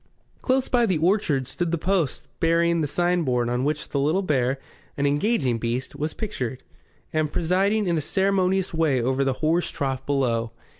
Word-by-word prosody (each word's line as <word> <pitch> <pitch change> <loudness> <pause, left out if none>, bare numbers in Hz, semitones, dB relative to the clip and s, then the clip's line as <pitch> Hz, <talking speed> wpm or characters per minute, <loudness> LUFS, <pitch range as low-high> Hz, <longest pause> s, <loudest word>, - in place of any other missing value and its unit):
Close 260 0 +1
by 240 -2 +2
the 185 -5 +1
orchard 160 -5 +1
stood 175 +6 -2
the 170 - 0
post 175 -4 0
bearing 170 0 +2
the 150 - 0
signboard 150 -8 +1
on 125 +1 0
which 150 +1 -2
the 140 - -1
Little 155 +8 +1
Bear, 135 -5 +1 0.4
an 140 - 0
engaging 145 - +1
beast, 120 +4 -3
was 150 +2 -3
pictured, 130 - -4 0.5
and 155 -1 0
presiding 195 +5 +1
in 170 -3 +1
a - - -2
ceremonious 190 +1 +1
way 160 -5 +2
over 130 +3 +1
the 135 -1 +1
horse 170 +3 +2
trough 135 -2 -3
below. 120 -5 0
155 Hz, 170 wpm, -24 LUFS, 135-180 Hz, 0.5 s, by